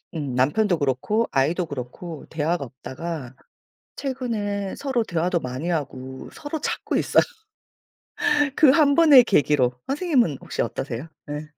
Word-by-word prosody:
음. 145 -5 -3
남편도 170 +8 +2
그렇고 145 - 0
아이도 155 +7 +1
그렇고 145 +4 -7
대화가 160 0 -1
없다가 135 +1 -7 0.6
최근에 215 -7 -3
서로 265 -4 0
대화도 170 -1 0
많이 130 +5 -4
하고 130 -4 -4
서로 295 +2 -5
찾고 - - -2
있어요 - - +4 1.3
그 295 -4 +7
1번의 285 -2 +7
계기로. 145 - +3 0.2
선생님은 275 - +1
혹시 - - -2
어떠세요? 135 +4 -4 0.2
예. 150 +1 -5
165 Hz, 285 characters per minute, -24 LUFS, -, 1.3 s, 그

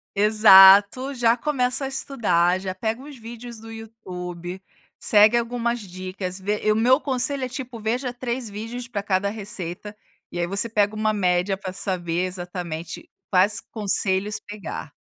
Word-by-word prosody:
Exato, 205 +4 +7
já 240 -1 +2
começa 270 -1 -1
a - - -2
estudar, 185 -10 0
já 190 -1 -4
pega 220 +6 -3
uns 285 -2 -11
vídeos 235 0 -9
do 225 0 -11
YouTube, 185 -5 -8 0.4
segue 215 +2 +5
algumas 235 0 -1
dicas, 185 -1 -6
vê 205 +2 -3
e 215 - +4
o - - +2
meu 250 +5 +4
conselho 265 0 -1
é, 255 - -3
tipo, 250 -2 -7
veja 245 +4 -2
3 245 -1 -4
vídeos 225 +4 -7
pra 205 -4 -4
cada 200 0 0
receita, 205 -2 -4 0.4
e 175 - -5
aí 175 - 0
você 200 +5 +1
pega 210 -1 +1
uma 215 0 0
média 180 -1 +1
pra 190 -1 -7
saber 180 -3 -2
exatamente, 175 -3 -6 0.2
quais 205 +4 +3
conselhos 200 -1 0
pegar. 205 -7 -8
210 Hz, 155 wpm, -23 LUFS, 185-235 Hz, 0.4 s, Exato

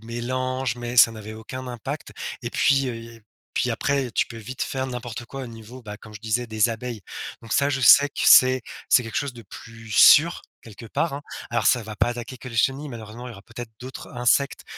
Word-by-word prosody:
mélanges, 130 +1 -2
mais 120 0 -6
ça 115 -1 +7
n'avait 110 0 -9
aucun 125 +4 -8
impact. 120 -3 -6 0.3
Et - - -4
puis, 135 -1 +2
heu, 120 - -4
et 115 -1 -12 0.3
puis 125 - +1
après, 135 +2 0
tu - - +1
peux 115 - -10
vite 125 +4 -6
faire 130 0 -3
n'importe 120 -1 -6
quoi 135 +2 -7
au - - -6
niveau, 115 +2 -11
bah, 105 -3 -8
comme 110 -1 -14
je 105 - -9
disais, 115 +1 -1
des 110 +1 +2
abeilles. 115 -1 -6 0.4
Donc 115 - -7
ça, 140 0 +3
je 135 -1 -1
sais 140 +3 +8
que - - -5
c'est 130 -1 +7 0.3
c'est 125 - +5
quelque 115 - -6
chose 140 -2 -1
de 120 -1 -12
plus 110 +2 -11
sûr, 170 +9 +7 0.2
quelque 115 +1 -12
part, 165 +6 -1
hein. 140 - -4 0.3
Alors 120 0 0
ça 125 - +4
va 110 -1 -7
pas 115 - +1
attaquer 120 +2 -6
que 125 - -9
le 115 - -8
chenille, 135 +5 +1
malheureusement, 115 0 -9
il - - -8
y - - -8
aura 100 - -13
peut-être 115 0 -9
d'autres 130 +1 -9
insectes, 125 +3 +1
120 Hz, 225 wpm, -24 LUFS, 115-130 Hz, 0.4 s, sais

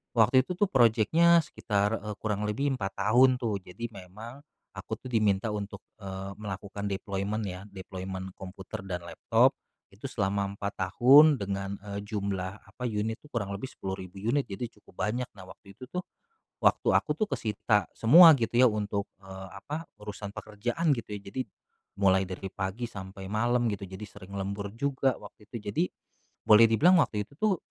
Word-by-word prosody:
waktu 115 +3 +5
itu 180 - -3
tuh 200 +1 +1
projeknya 135 +8 +5
sekitar, 105 -7 -1
eee, 105 0 -6
kurang 105 -1 -1
lebih 140 +7 0
4 95 0 -3
tahun 125 +6 +5
tuh. 115 -5 -2
Jadi 115 +6 -7
memang 105 +6 -10 0.3
aku - - -6
tuh 130 - -10
diminta 105 -2 +2
untuk, 100 -1 -5 0.2
eee, 95 -1 -6
melakukan 100 0 -5
deployment 100 +2 -2
ya, 95 0 -6
deployment 95 -1 -7
komputer 95 0 -8
dan 90 -2 -4
laptop, 85 - +3 0.4
itu 110 +8 -7
selama 100 -4 -1
4 100 0 -3
tahun, 140 +7 +7
dengan, 100 -1 -3
eee, 100 -1 -5
jumlah, 100 -2 -3
apa, 125 -1 -5
unit 110 +1 -2
tuh 150 - -17
kurang 105 -7 -3
lebih 105 +7 -5
10.000 95 -4 -7
unit, 125 +6 +2
jadi 100 +5 -4
cukup 95 - -5
banyak. 120 +4 -2
Nah, 95 - -10
waktu 100 +1 -15
itu 130 - -9
tuh, 180 +8 -4 0.6
waktu - - +3
aku - - +2
tuh 215 - +2
kesita 105 - 0
semua 165 +9 +8
gitu 115 -2 -1
ya 125 0 +6
untuk, 105 -1 -2
eee, 95 0 -10
apa, 155 +3 -7
urusan 105 -1 -7
pekerjaan 120 +10 -1
gitu 115 - -7
ya. - - -15
Jadi 130 - -3 0.6
mulai 95 -1 +4
dari 95 +1 -6
pagi 95 +5 -3
sampai 95 -3 -9
malam 120 +4 +1
gitu, 100 - -5
jadi 95 +3 -8
sering 100 0 -11
lembur 100 +1 -3
juga 135 -1 +1
waktu 105 +1 -14
itu. - - -6 0.2
Jadi 165 - +2 0.6
boleh 110 +2 +8
dibilang 170 +10 +6
waktu 105 -1 -2
itu - - -29
tuh 215 -3 +3
105 Hz, 170 wpm, -29 LUFS, 100-120 Hz, 0.6 s, semua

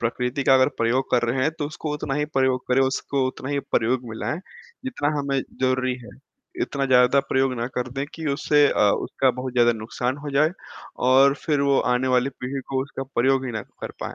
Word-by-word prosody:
प्रकृति 125 +4 -1
का 135 - +6
अगर 130 +1 +5
प्रयोग 125 +3 +1
कर 120 - +3
रहे 130 +2 0
हैं, 155 - +2
तो 145 - -1
उसको 150 0 -5
उतना 145 -2 -3
ही 150 - 0
प्रयोग 130 -1 +2
करें, 125 +1 +3
उसको 135 0 0
उतना 130 0 -6
ही 145 - 0
प्रयोग 120 +3 +2
में 110 - -7
लाएँ, 150 - -3 0.5
जितना 240 - -1
हमें 140 -1 0 0.2
ज़रूरी 130 0 +1
है। - - -11 0.5
इतना 140 - -2
ज़्यादा 125 +1 +5
प्रयोग 135 0 +2
ना 120 - -1
कर 125 0 -1
दें 135 +1 -2
कि 160 -1 -6
उससे 145 +1 +3
अ, - - 0 0.2
उसका 135 - +1
बहुत 125 +1 -5
ज़्यादा 120 -1 +4
नुकसान 120 +3 -3
हो 145 - -4
जाए, 150 +3 +3 0.5
और 135 +2 +5
फिर 150 -3 +1
वो 140 -1 +3 0.2
आने 130 +1 0
वाली 125 +1 +2
पीढ़ी 135 +2 -3
को 130 -1 0
उसका 135 0 -6
प्रयोग 130 +2 +2
ही 125 - -4
ना 110 -2 -3 0.2
कर - - -5
पाएँ, - - -5
130 Hz, 215 wpm, -23 LUFS, 125-140 Hz, 0.5 s, का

